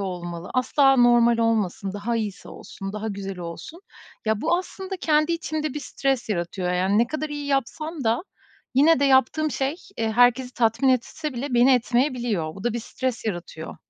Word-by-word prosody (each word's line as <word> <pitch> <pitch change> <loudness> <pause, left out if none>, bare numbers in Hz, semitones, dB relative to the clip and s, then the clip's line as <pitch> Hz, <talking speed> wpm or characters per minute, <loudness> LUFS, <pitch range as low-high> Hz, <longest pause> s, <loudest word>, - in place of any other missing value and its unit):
olmalı, 175 -2 -5
asla 270 +2 +4
normal 240 -1 +5
olmasın, 210 -4 0
daha 205 +4 -2
iyisi 210 -4 -4
olsun, 195 0 -8
daha 215 +1 -4
güzel 195 -2 -5
olsun. 175 - -8 0.4
Ya, 220 -1 0
bu 330 +5 +2
aslında 380 +1 -6
kendi 305 -1 +2
içimde 310 -3 -3
bir 295 - -3
stres 270 -2 -2
yaratıyor. 180 -1 -2
Yani, 190 +3 +2
ne 235 - +4
kadar 310 +2 -4
iyi 290 -1 -5
yapsam 285 +3 -2
da 230 +6 +1 0.5
yine 300 +3 +5
de - - +3
yaptığım 275 +3 +3
şey, 275 +3 -1 0.2
eee, 225 -1 0
herkesi 245 +2 +3
tatmin 230 +2 +2
etse 285 +4 0
bile 255 +2 -3
beni 245 +3 +6
etmeyebiliyor. 240 - 0
Bu 195 - -10
da 240 - +1
bir 235 - -3
stres 250 +1 -4
yaratıyor. 175 -5 -5
240 Hz, 175 wpm, -24 LUFS, 205-280 Hz, 0.5 s, beni